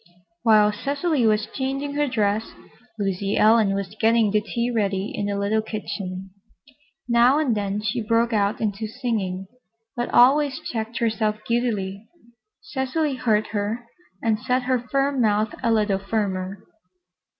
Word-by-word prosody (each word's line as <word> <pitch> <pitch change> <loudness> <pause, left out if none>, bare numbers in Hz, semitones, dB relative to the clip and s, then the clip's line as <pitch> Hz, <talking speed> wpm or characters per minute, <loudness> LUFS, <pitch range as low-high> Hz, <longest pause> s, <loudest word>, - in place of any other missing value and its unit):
While 215 -3 +5
Cecily 280 +3 0
was 215 0 +2
changing 275 +1 -2
her 295 0 +1
dress, 215 -3 0 0.4
Lucy 195 -1 -1
Ellen 215 -2 +4
was 200 0 -4
getting 225 -2 +4
the 210 0 +2
tea 235 +3 -2
ready 200 -3 -1
in 205 - -2
the 200 0 -2
little 205 +2 +1
kitchen. 195 -3 -6 0.8
Now 240 +3 +5
and 285 -7 +1
then 205 0 -2
she 230 +3 -1
broke 230 +2 +1
out 205 0 +1
into 215 0 -2
singing, 210 -6 -3 0.5
but 240 -1 -2
always 270 +3 +4
checked 225 0 -4
herself 220 -2 0
guiltily. 220 -4 -1 0.5
Cecily 275 +3 -1
heard 220 -4 +1
her 215 +3 -2 0.4
and 220 -2 +1
set 250 +1 0
her 255 0 +1
firm 275 +2 0
mouth 215 -1 +2
a 230 - +1
little 210 -3 +2
firmer. 195 -1 -3
220 Hz, 140 wpm, -23 LUFS, 205-245 Hz, 0.8 s, While